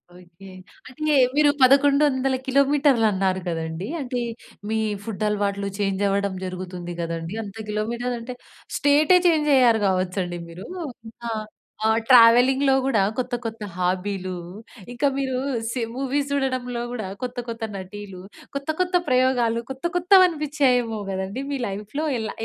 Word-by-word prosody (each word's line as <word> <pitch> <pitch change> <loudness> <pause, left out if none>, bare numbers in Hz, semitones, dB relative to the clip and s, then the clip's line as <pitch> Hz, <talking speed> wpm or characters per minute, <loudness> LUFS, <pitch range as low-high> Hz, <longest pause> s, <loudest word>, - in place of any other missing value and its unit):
Okay. 180 +2 -15 0.4
అంటే 305 +4 -1 0.2
మీరు 300 -1 +5
1100 275 0 +4
కిలోమీటర్లన్నారు 255 -9 +2
కదండీ! 165 +2 -3
అంటే 250 -1 -3 0.5
మీ 220 - 0 0.3
ఫుడ్ 215 -2 -5
అలవాట్లు 200 -1 -1
చేంజ్ 195 -1 -1
అవ్వడం 200 -1 0
జరుగుతుంది 180 -1 -6
గదండీ. 165 +1 -4
అంత 200 0 -10
కిలోమీటర్లంటే 235 +3 -3 0.4
స్టేటే 295 +5 +5
చేంజ్ 305 -3 +2
అయ్యారు 240 -4 +5
గావచ్చండి 185 -1 -1
మీరు. 175 +3 -10 0.6
ఆ! - - -2 0.5
ఆ! - - +4 0.2
ట్రావెలింగ్‌లో 255 +3 +6
గూడా 225 -7 +2 0.2
కొత్త, 250 0 -3
కొత్త 225 -1 -5
హాబీలు, 185 0 -2 0.5
ఇంకా 250 +4 0
మీరు 265 -2 -1 0.4
సి 250 - -2
మూవీస్ 275 +1 -1
జూడడంలో 255 -3 -1
కూడా 220 -6 -4 0.2
కొత్త 250 0 -4
కొత్త 230 0 -5
నటీలు, 190 0 -8 0.3
కొత్త 280 +2 -4
కొత్త 365 0 0
ప్రయోగాలు, 250 -2 +2
కొత్త 265 +5 -7
కొత్తవనిపించాయేమో 300 - +3
గదండీ 190 +7 -4
మీ 275 - -2
లైఫ్‌లో. 210 +10 -4
ఏల 220 -1 -3
235 Hz, 125 wpm, -23 LUFS, 195-270 Hz, 0.6 s, ట్రావెలింగ్‌లో